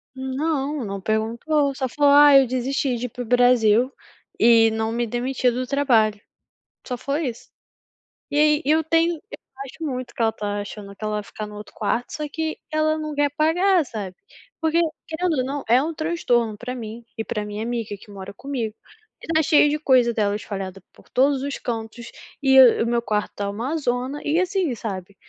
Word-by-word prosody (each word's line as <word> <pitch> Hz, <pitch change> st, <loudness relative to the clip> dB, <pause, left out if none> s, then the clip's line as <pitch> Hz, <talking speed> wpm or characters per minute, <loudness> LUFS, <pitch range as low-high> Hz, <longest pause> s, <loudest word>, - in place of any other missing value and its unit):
Não, 275 Hz, +2 st, -2 dB
não 200 Hz, -2 st, -4 dB
perguntou. 235 Hz, +8 st, 0 dB
Só 265 Hz, -1 st, -2 dB
falou: 285 Hz, +3 st, +3 dB
"Ah 290 Hz, 0 st, +8 dB
eu 270 Hz, -, +6 dB
desisti 255 Hz, +1 st, -1 dB
de 240 Hz, -, -4 dB
ir -, -, -4 dB
para 245 Hz, +2 st, -6 dB
o -, -, -9 dB
Brasil 245 Hz, 0 st, +4 dB, 0.5 s
e 230 Hz, -1 st, +6 dB
não 220 Hz, 0 st, -1 dB
me 235 Hz, +1 st, -1 dB
demiti 250 Hz, +2 st, 0 dB
do 250 Hz, +2 st, -2 dB
trabalho." 240 Hz, -7 st, +2 dB, 0.7 s
Só 250 Hz, -, -3 dB
foi 280 Hz, +3 st, -2 dB
isso. 235 Hz, -1 st, -9 dB, 0.8 s
E -, -, -3 dB
aí 300 Hz, +1 st, +4 dB
eu 310 Hz, +3 st, +3 dB
tenho 330 Hz, +2 st, +2 dB
eu 415 Hz, +8 st, -12 dB, 0.3 s
acho 270 Hz, -, -11 dB
muito 255 Hz, -4 st, -4 dB
que -, -, -11 dB
ela 225 Hz, -1 st, +3 dB
tá 205 Hz, -1 st, -3 dB
achando 205 Hz, -1 st, -8 dB
que 215 Hz, -, -8 dB
ela 215 Hz, 0 st, -1 dB
vai 210 Hz, -, -2 dB
ficar 210 Hz, +1 st, -7 dB
no 210 Hz, -, -11 dB
outro 210 Hz, 0 st, -10 dB
quarto, 245 Hz, -, -2 dB
só 305 Hz, -, -4 dB
que 315 Hz, +1 st, -3 dB
ela 310 Hz, 0 st, +1 dB
não 305 Hz, -1 st, -4 dB
quer 290 Hz, 0 st, +1 dB
pagar, 335 Hz, +5 st, +2 dB
sabe. 200 Hz, -6 st, -6 dB, 0.4 s
Porque 325 Hz, +1 st, +2 dB, 0.3 s
querendo 320 Hz, -1 st, -1 dB
ou 255 Hz, -, +1 dB
não 275 Hz, +2 st, -3 dB
é 240 Hz, +3 st, +5 dB
um 320 Hz, +2 st, -3 dB
transtorno 245 Hz, -10 st, 0 dB
pra 250 Hz, +4 st, -5 dB
mim 230 Hz, -1 st, -8 dB
e 225 Hz, -, -3 dB
pra 210 Hz, -3 st, -3 dB
minha 210 Hz, +1 st, -5 dB
amiga, 230 Hz, -3 st, -3 dB
que 205 Hz, -, -17 dB
mora 200 Hz, 0 st, -9 dB
comigo. 235 Hz, -3 st, -4 dB, 0.6 s
Tá 315 Hz, -, +4 dB
cheio 300 Hz, -1 st, +5 dB
de 300 Hz, -, 0 dB
coisas 255 Hz, -5 st, +3 dB
dela 205 Hz, -2 st, 0 dB
espalhadas 195 Hz, -3 st, -6 dB
por -, -, -21 dB
todos 270 Hz, +1 st, +2 dB
os 280 Hz, 0 st, -3 dB
cantos, 230 Hz, 0 st, -5 dB, 0.3 s
e 265 Hz, -1 st, +7 dB
o 245 Hz, -4 st, +6 dB
o -, -, -2 dB
meu 235 Hz, 0 st, +1 dB
quarto 210 Hz, -3 st, -2 dB
tá 200 Hz, -1 st, -2 dB
uma 235 Hz, +10 st, -3 dB
zona 255 Hz, +1 st, -2 dB
e 305 Hz, +3 st, +1 dB
assim, 370 Hz, -, 0 dB
sabe. 195 Hz, -3 st, -6 dB
250 Hz, 200 wpm, -23 LUFS, 220-290 Hz, 0.8 s, Ah